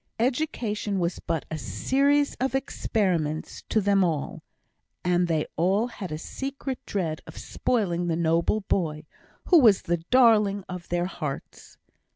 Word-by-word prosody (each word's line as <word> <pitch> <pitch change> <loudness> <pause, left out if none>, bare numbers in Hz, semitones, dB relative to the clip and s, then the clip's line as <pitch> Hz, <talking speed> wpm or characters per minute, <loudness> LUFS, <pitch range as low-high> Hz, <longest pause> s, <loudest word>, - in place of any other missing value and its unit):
Education 235 -5 -1
was 175 -1 -1
but 165 -2 -3
a 160 - -3
series 280 - +1
of 265 +1 0
experiments 180 - -1
to 220 - +3
them 200 -1 +3
all, 160 -5 -2 0.6
and 180 0 +2
they 160 -2 0
all 190 +7 +2
had 210 -7 -7
a 155 - -3
secret 270 - -5
dread 165 -6 -2
of 160 - -11
spoiling 175 -8 -1
the 165 - +1
noble 170 +5 +1
boy, 160 -6 -1 0.4
who 350 - +8
was 220 -8 +5
the 175 0 0
darling 210 0 +4
of 180 -1 -7
their 175 0 0
hearts. 150 -6 -6
190 Hz, 145 wpm, -26 LUFS, 170-235 Hz, 0.6 s, who